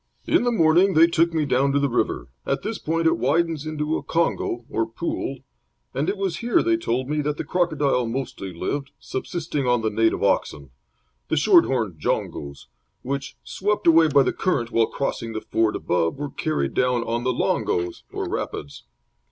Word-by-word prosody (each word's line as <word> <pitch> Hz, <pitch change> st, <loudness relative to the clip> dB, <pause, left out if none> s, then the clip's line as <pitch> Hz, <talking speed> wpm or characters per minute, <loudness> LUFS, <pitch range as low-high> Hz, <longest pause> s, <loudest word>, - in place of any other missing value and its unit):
"In -, -, +3 dB
the 245 Hz, -, +2 dB
morning 180 Hz, -1 st, +4 dB
they 160 Hz, +1 st, +8 dB
took 170 Hz, 0 st, +2 dB
me 160 Hz, -2 st, 0 dB
down 140 Hz, 0 st, +2 dB
to 140 Hz, -, +3 dB
the 140 Hz, -, +2 dB
river. 125 Hz, -, -1 dB, 0.2 s
At -, -, -2 dB
this 220 Hz, +1 st, -3 dB
point 165 Hz, +1 st, -1 dB
it 160 Hz, -, +3 dB
widens 155 Hz, +4 st, 0 dB
into 155 Hz, 0 st, -1 dB
a -, -, -5 dB
kongo, 145 Hz, -7 st, -1 dB
or 115 Hz, 0 st, -1 dB
pool, 135 Hz, +1 st, -4 dB, 0.5 s
and 140 Hz, +7 st, -1 dB
it 200 Hz, -, -1 dB
was 195 Hz, -3 st, -2 dB
here, 245 Hz, +9 st, +2 dB
they 340 Hz, 0 st, +3 dB
told 130 Hz, -, -1 dB
me, 150 Hz, +1 st, 0 dB
that 150 Hz, 0 st, -2 dB
the -, -, -3 dB
crocodile 150 Hz, -7 st, +1 dB
mostly 115 Hz, -5 st, -4 dB
lived, 135 Hz, +11 st, -3 dB
subsisting 150 Hz, 0 st, -3 dB
on 125 Hz, -2 st, +2 dB
the 110 Hz, -, 0 dB
native 110 Hz, +1 st, +1 dB
oxen 70 Hz, -3 st, 0 dB, 0.6 s
the -, -, 0 dB
short 175 Hz, +3 st, +6 dB
horned 110 Hz, -11 st, -2 dB
jongos 70 Hz, -1 st, -3 dB, 0.4 s
which, 140 Hz, +1 st, -4 dB
swept 210 Hz, +2 st, -2 dB
away 165 Hz, -1 st, +6 dB
by 145 Hz, -2 st, +5 dB
the -, -, 0 dB
current 120 Hz, -11 st, -1 dB
while 115 Hz, -1 st, +3 dB
crossing 115 Hz, -4 st, -3 dB
the 110 Hz, -, -4 dB
ford 110 Hz, -1 st, 0 dB
above, 85 Hz, +4 st, 0 dB
were 145 Hz, 0 st, -4 dB
carried 70 Hz, -, -2 dB
down 125 Hz, -2 st, +1 dB
on 115 Hz, +1 st, -2 dB
the 130 Hz, -, +1 dB
longos, 90 Hz, -7 st, -1 dB
or -, -, -3 dB
rapids. 70 Hz, -, -5 dB
140 Hz, 185 wpm, -23 LUFS, 115-165 Hz, 0.6 s, they